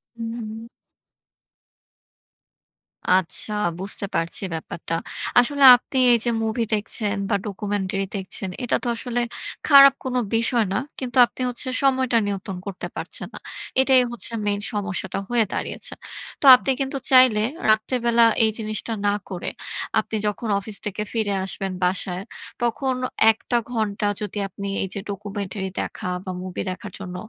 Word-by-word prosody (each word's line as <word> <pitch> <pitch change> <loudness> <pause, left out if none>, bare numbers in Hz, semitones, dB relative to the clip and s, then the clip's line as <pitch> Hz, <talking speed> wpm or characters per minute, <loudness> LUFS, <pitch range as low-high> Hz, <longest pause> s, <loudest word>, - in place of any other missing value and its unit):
হু, 230 - -7
হু। 225 0 -7 2.5
আচ্ছা, 185 +3 0 0.3
বুঝতে 195 +1 -3
পারছি 165 +4 -1
ব্যাপারটা। 165 +1 -4 0.4
আসলে, 280 +3 +2
আপনি 255 +2 -5 0.2
এই 235 - +5
যে - - +2
মুভি 220 +1 0
দেখছেন, 210 0 0
বা 205 - +2
ডকুমেন্টারি 195 -1 -2
দেখছেন, 190 0 -4
এটা 245 - +1
তো 245 - -2
আসলে 245 +1 -2 0.5
খারাপ 275 -2 +9
কোন 255 -1 -3 0.2
বিষয় 230 0 +2
না। - - +1 0.2
কিন্তু 255 -1 -4
আপনি 250 - -10
হচ্ছে 250 +2 -1 0.2
সময়টা 260 -3 +3
নিয়ন্ত্রন 195 -1 -4
করতে 185 -3 -5
পারছেন - - -4
না। - - -7 0.4
এটাই 265 -1 +5
হচ্ছে, 240 0 -3
মেইন 205 0 0
সমস্যাটা 190 -2 -3
হয়ে 240 -2 +3
দাঁড়িয়েছে। - - -4 0.5
তো - - -1
আপনি 270 - 0
কিন্তু 270 0 -2
চাইলে, 255 -5 +6 0.3
রাত্রেবেলা 235 +2 +3 0.2
এই 220 - +3
জিনিসটা 215 +1 -3
না 205 - +3 0.2
করে, 180 -3 -4 0.5
আপনি 220 - -4
যখন 210 +3 -3
অফিস 200 0 -7
থেকে 210 0 -3
ফিরে 215 -3 0
আসবেন 195 0 -3
বাসায়, 180 0 -1 0.4
তখন 255 +3 0 0.4
১ 220 - -8
টা 240 - +4
ঘন্টা 215 -3 -1
যদি 210 0 -5
আপনি 200 +1 -7 0.2
এই 195 - -2
যে 200 - -3
ডকুমেন্টারি 200 -1 -4
দেখা - - -5 0.2
বা 185 - -3
মুভি 185 -1 -5
দেখার 185 +2 -8
জন্য 180 -2 -7
215 Hz, 145 wpm, -23 LUFS, 195-240 Hz, 2.5 s, খারাপ